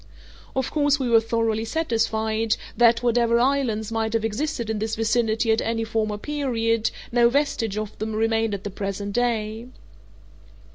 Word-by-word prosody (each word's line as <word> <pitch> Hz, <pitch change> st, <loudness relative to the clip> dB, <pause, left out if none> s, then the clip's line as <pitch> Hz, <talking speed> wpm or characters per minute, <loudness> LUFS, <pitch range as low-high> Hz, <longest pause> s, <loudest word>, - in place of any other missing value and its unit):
Of 265 Hz, -2 st, -1 dB
course 290 Hz, -1 st, +2 dB
we 255 Hz, -3 st, -1 dB
were 230 Hz, -, +7 dB
thoroughly 225 Hz, -1 st, 0 dB
satisfied 225 Hz, -5 st, 0 dB, 0.2 s
that, 235 Hz, 0 st, +4 dB
whatever 235 Hz, -1 st, +3 dB
islands 240 Hz, -5 st, 0 dB
might 225 Hz, -1 st, -1 dB
have 225 Hz, -1 st, +1 dB
existed 235 Hz, +2 st, -2 dB
in 220 Hz, -1 st, -2 dB
this 220 Hz, +1 st, -2 dB
vicinity 225 Hz, 0 st, +1 dB
at 220 Hz, -, +2 dB
any 225 Hz, 0 st, -1 dB
former 220 Hz, -2 st, -1 dB
period, 230 Hz, -4 st, 0 dB, 0.2 s
no 235 Hz, 0 st, +5 dB
vestige 240 Hz, -6 st, 0 dB
of 215 Hz, -1 st, -4 dB
them 220 Hz, 0 st, -3 dB
remained 225 Hz, -1 st, +1 dB
at 195 Hz, -, -8 dB
the 205 Hz, -, -5 dB
present 200 Hz, +1 st, -4 dB
day. 230 Hz, -1 st, -1 dB
225 Hz, 155 wpm, -24 LUFS, 220-240 Hz, 0.2 s, were